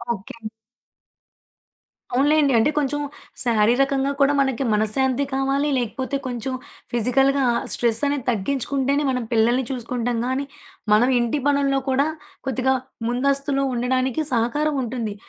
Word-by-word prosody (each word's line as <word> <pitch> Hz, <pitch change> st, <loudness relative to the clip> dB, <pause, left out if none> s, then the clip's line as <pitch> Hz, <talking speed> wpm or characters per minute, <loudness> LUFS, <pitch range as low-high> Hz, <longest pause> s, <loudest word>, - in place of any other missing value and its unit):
Okay. 200 Hz, +3 st, -12 dB, 1.7 s
అవునులేండి. 285 Hz, +2 st, +3 dB
అంటే, 225 Hz, +6 st, +3 dB
కొంచెం 290 Hz, 0 st, 0 dB, 0.4 s
శారీరకంగా 265 Hz, +5 st, +2 dB
కూడా 280 Hz, +1 st, +4 dB
మనకి 270 Hz, -1 st, 0 dB
మనశ్శాంతీ 250 Hz, +6 st, +1 dB
కావాలి. 275 Hz, +2 st, +1 dB
లేకపోతే 260 Hz, +3 st, -2 dB
కొంచెం 250 Hz, +1 st, -4 dB, 0.4 s
ఫిజికల్‌గా 270 Hz, +4 st, +2 dB, 0.3 s
స్ట్రెస్సనేది 250 Hz, +3 st, 0 dB
తగ్గించుకుంటేనే, 275 Hz, +5 st, 0 dB
మనం 250 Hz, -1 st, -1 dB
పిల్లలని 240 Hz, +3 st, +3 dB
చూసుకుంటాం 245 Hz, -1 st, -2 dB
గానీ, 260 Hz, +2 st, -1 dB, 0.5 s
మనం 235 Hz, +4 st, +4 dB
ఇంటి 240 Hz, +5 st, 0 dB
పనుల్లో 280 Hz, -1 st, +2 dB
కూడా 270 Hz, +3 st, +2 dB, 0.4 s
కొద్దిగా 265 Hz, +1 st, +1 dB, 0.4 s
ముందస్తులో 275 Hz, +2 st, 0 dB
ఉండడానికి 255 Hz, +3 st, 0 dB
సహకారముంటుంది. 245 Hz, -3 st, -1 dB
260 Hz, 100 wpm, -22 LUFS, 240-275 Hz, 1.7 s, కూడా